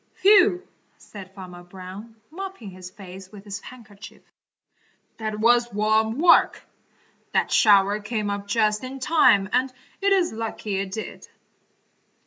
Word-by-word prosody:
"Phew!" 380 -2 +4 0.3
said 195 -3 -12
Farmer 180 -2 -10
Brown, 190 +5 -11 0.2
mopping 375 - -8
his 185 0 -10
face 190 0 -12
with 205 -2 -12
his 200 0 -6
handkerchief, 215 -5 -14 0.9
"that 215 -1 -4
was 240 +1 +3
warm 220 +2 +1
work! 335 +3 +4 0.7
That - - +1
shower 205 -1 +4
came 210 -1 -3
up 200 0 -5
just 210 +1 0
in 260 +1 -7
time 250 -9 +3
and 255 +1 +1 0.3
it 400 0 +2
is 370 - +2
lucky 220 -2 -4
it 195 0 -3
did." 220 +2 -7
215 Hz, 130 wpm, -23 LUFS, 195-245 Hz, 0.9 s, Phew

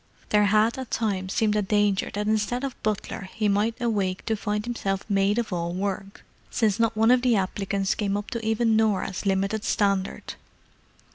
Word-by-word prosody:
There 210 -1 +4
had 215 +4 +3
at 260 - -6
times 195 -4 -1
seemed 210 0 +1
a 210 - +2
danger 205 -1 +1
that 210 0 -1
instead 220 +4 0
of 270 -2 -5
butler 200 -2 -3
he 215 -2 +1
might 210 +4 +1
awake 200 -6 -1
to 220 - 0
find 210 0 -2
himself 195 -5 -2
maid 200 0 +2
of 235 -5 -1
all 170 0 -2
work, 195 +1 -4 0.3
since 220 -2 +1
not 230 -1 +1
one 225 +2 +5
of 250 0 +5
the 245 -2 +3
applicants 195 0 -1
came 200 -1 -1
up 205 - -6
to 230 -1 -3
even 220 +1 +2
Norah's 205 -3 0
limited 195 +2 0
standard. 200 -3 0
210 Hz, 185 wpm, -25 LUFS, 195-225 Hz, 0.3 s, one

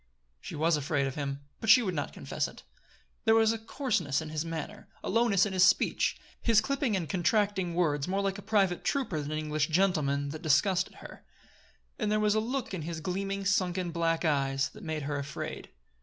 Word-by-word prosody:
She - - -8
was 160 +1 +2
afraid 145 -1 0
of 135 - -3
him; 140 -1 -4 0.2
but 225 - -3
she 250 +2 +8
would 185 -4 -1
not 145 -3 -3
confess - - -3
it. - - -13 0.6
There 225 0 +5
was 225 0 +4
a 225 - -4
coarseness 215 - -1
in 160 -1 -6
his 155 0 -2
manner; 165 -2 -6 0.2
a - - -3
lowness 215 -3 +3
in 200 - -3
his 185 -1 +4
speech, - - +3 0.2
his 230 -2 +4
clipping 275 -1 0
and 175 -4 -2
contracting 190 0 +1
words 150 -4 +1
more 195 +2 0
like 195 0 -1
a - - -8
private 195 -3 +1
trooper 260 - -1
than 145 0 -4
like - - -3
an 155 - -2
English 150 0 0
gentleman, 155 -6 +1
that 155 +2 -6
disgusted 180 +4 +2
her; - - -12 0.8
and 210 -3 0
there 215 - +2
was 210 -1 +3
a 215 - +2
look 240 0 -3
in 185 - -3
his 165 +1 -5
gleaming, 195 +3 -3
sunken 185 -2 +1
black 165 0 0
eyes 135 -2 +1
that - - -14
made 155 -3 -3
her 145 0 -2
afraid. 140 -1 -6
180 Hz, 210 wpm, -30 LUFS, 155-205 Hz, 0.8 s, she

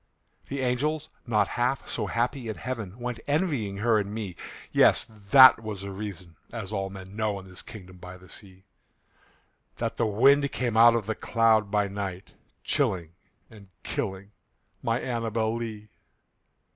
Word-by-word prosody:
The 140 0 -3
angels, 145 +5 -1 0.2
not 105 -3 +2
half 125 +2 -1
so - - -2
happy 120 +1 -1
in 110 - -3
heaven, 110 -6 -5
Went 120 -1 -4
envying 145 - 0
her 110 +1 +3
and 100 -1 -3
me 105 -5 -5 0.4
Yes! - - +5
that 115 +4 +7
was 105 -3 -6
the 100 0 -6
reason 95 -4 -7
(as 110 -4 -5
all 95 -2 -2
men 95 0 -10
know, 110 -2 -1
In 95 - -13
this 95 -1 -5
kingdom 95 -4 -11
by 90 +1 -10
the 90 0 -17
sea) 95 -1 -13 1.1
That - - -3
the 115 - +1
wind 140 +7 +4
came 120 -3 -2
out 115 +1 +7
of 115 -3 -1
the 110 - -1
cloud 110 -2 +2
by 105 0 +1
night, 95 -2 -6 0.3
Chilling 85 -4 0 0.4
and 105 -3 -15 0.2
killing 95 +1 -4 0.5
my 115 -1 0
ANNABEL 115 -2 -1
LEE. 110 -2 -6
110 Hz, 160 wpm, -27 LUFS, 100-120 Hz, 1.1 s, that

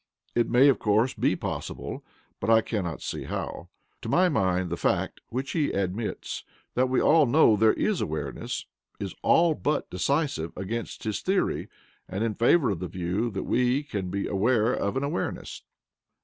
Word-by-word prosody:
It 120 -1 +1
may, 125 +4 +6
of 140 - +4
course, 110 +4 +2
be - - +1
possible, - - -5 0.4
but - - -2
I 110 0 +6
cannot 95 -9 -3
see - - -4
how. - - -5 0.3
To - - -5
my 180 +1 +4
mind 95 - +1
the - - 0
fact - - -1
(which 130 +3 -3
he 155 -4 +1
admits) 100 +3 -3 0.3
that 130 +1 +2
we 130 - +1
know 150 -6 +5
there 110 +1 +4
is 215 -4 0
awareness, 80 0 -4 0.3
is 100 -2 -4
ALL 165 -1 +4
BUT 150 0 -1
decisive 135 - 0
against 115 +5 -4
his 105 -3 -2
theory, 190 +1 0 0.4
and 95 +4 -2
in 115 -2 0
favour 125 +3 +3
of 95 - -3
the 90 - -3
view 90 +7 -2
that 100 -3 -4
we 125 +3 +1
can 100 -10 -4
be 100 +2 -2
aware 110 +4 +2
of 100 +6 -1
an 135 - -1
awareness. 145 +5 -3
115 Hz, 170 wpm, -27 LUFS, 95-140 Hz, 0.4 s, may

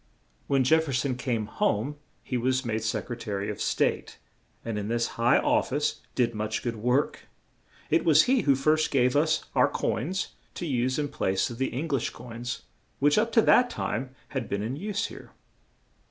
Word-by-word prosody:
When 135 -1 +3
Jef 160 +5 +4
fer 140 - -4
son 130 +1 0
came 120 -3 -1
home 110 +5 0 0.3
he 130 - -4
was 130 +2 +1
made 110 -1 -1
Sec 110 - -2
re 120 - -4
ta 110 -3 -6
ry 100 0 -2
of 105 - -5
State, - - 0 0.5
and 115 -2 -2
in 105 - -4
this 115 +1 0
high 120 +1 +3
of - - +2
fice 145 +3 -1
did 120 -2 +2
much 110 0 -3
good 115 -2 -2
work; 125 +6 0 0.6
it 165 - +3
was 155 -2 +6
he 260 -1 +3
who 140 -2 +4
first 155 +4 +2
gave 125 -1 +2
us 155 +2 +2
our - - +4
own - - -9
coins 170 +12 -1 0.3
to 175 - -4
use 130 -3 0
in 145 -1 -1
place 95 -1 0
of 120 - -8
the 135 - 0
Eng 145 +7 -3
lish 135 -5 0
coins, 120 0 -7 0.3
which, 145 +6 +4
up 230 +2 0
to 225 - +5
that 245 0 +5
time 130 - -3
had 130 -4 -4
been 100 +1 -1
in 120 +5 -3
use 205 +6 -2
here. - - -10
130 Hz, 200 wpm, -27 LUFS, 115-150 Hz, 0.6 s, was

